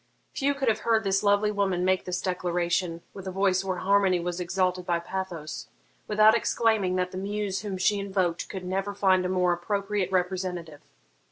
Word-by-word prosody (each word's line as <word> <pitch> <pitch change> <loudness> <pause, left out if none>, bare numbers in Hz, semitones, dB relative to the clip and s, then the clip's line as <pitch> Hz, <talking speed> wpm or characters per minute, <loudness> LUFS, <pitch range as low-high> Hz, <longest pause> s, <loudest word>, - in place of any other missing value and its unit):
Few 280 0 0
could 275 -2 -2
have 225 - +2
heard 225 -1 +2
this 195 -1 +1
lovely 205 +1 +3
woman 190 -3 0
make 185 0 +1
this 180 -1 -2
declaration, 175 -1 -1
with 195 -1 -9
a - - -3
voice 190 0 +1
where 185 -1 -2
harmony 195 -1 +3
was 175 +1 -3
exalted 180 0 0
by 175 -1 0
pathos, 170 -3 -5 0.4
without 215 +1 +5
exclaiming 220 -5 +1
that 180 0 -1
the 185 - -5
muse 200 0 -2
whom 200 -3 -4
she 200 +2 +2
invoked 190 -4 -1
could 190 -2 -6
never 195 +2 -2
find 185 -2 +3
a - - -4
more 180 -1 +2
appropriate 200 +1 -2
representative. 180 -4 -2
190 Hz, 180 wpm, -27 LUFS, 180-200 Hz, 0.4 s, without